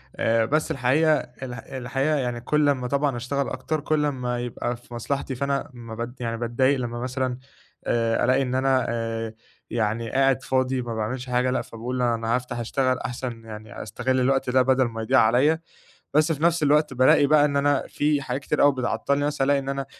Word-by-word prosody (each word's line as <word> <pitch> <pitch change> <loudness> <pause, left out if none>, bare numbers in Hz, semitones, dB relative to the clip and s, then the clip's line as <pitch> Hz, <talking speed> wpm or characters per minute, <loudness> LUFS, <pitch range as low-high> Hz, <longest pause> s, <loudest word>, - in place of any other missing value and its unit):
آآ، 115 0 +2
بس 155 +6 0
الحقيقة 135 +5 +3
ال 125 0 -8
الحقيقة 135 +4 -2
يعني، 125 -4 -2
كل 150 +3 +2
أمّا 130 -3 0
طبعًا 140 -1 0
أشتغل 140 +3 -2
أكتر، 145 +4 -3
كل 150 0 0
أما 125 -4 -2
يبقى 120 0 -3
في 120 0 -16
مصلحتي، 135 +2 -3
فأنا 140 +2 -1
ما 115 -2 -9
بض 120 +1 -5
يعني، 115 -1 -3
بتضايق 130 +3 +1
لمّا 120 -1 -4
مثلًا 130 0 -2 0.5
آآ، 115 -1 +1
ألاقي 130 +2 +3
إن 130 -1 -1
أنا 130 -1 +2
آآ، 115 -1 -3 0.4
يعني 115 0 -1
قاعد 135 -1 +2
فاضي، 130 0 0
ما 115 -1 -5
باعملش 120 +4 -3
حاجة. 125 +1 +1
لأ، 130 - 0
فباقول: 125 +3 -5
"أنا 115 -1 +1
هافتح، 125 -1 -4
اشتغل، 130 +2 0
أحسن 120 -2 -5
يعني، 110 -1 -8
أستغل 125 +4 -1
الوقت 135 0 +1
ده، 130 +1 +4
بدل 130 0 +3
ما 115 -1 -5
يضيع 130 +4 +3
عليَّا." 130 +8 +4 0.5
بس 155 +2 +3
في 155 +1 -3
نفس 170 -1 +3
الوقت، 150 -1 +3
بالاقي 130 +3 +5
بقى 150 0 +5
إن 140 -1 0
أنا 145 -1 +2
في 145 -1 0
حاجات 135 0 -3
كتير 150 - -1
أوي 145 - +6
بتعطِّلني. 130 +3 0
مثلًا، 145 -2 0
ألاقي 140 0 +3
إن 135 0 -5
أنا 140 -1 -2
130 Hz, 195 wpm, -24 LUFS, 120-140 Hz, 0.5 s, أوي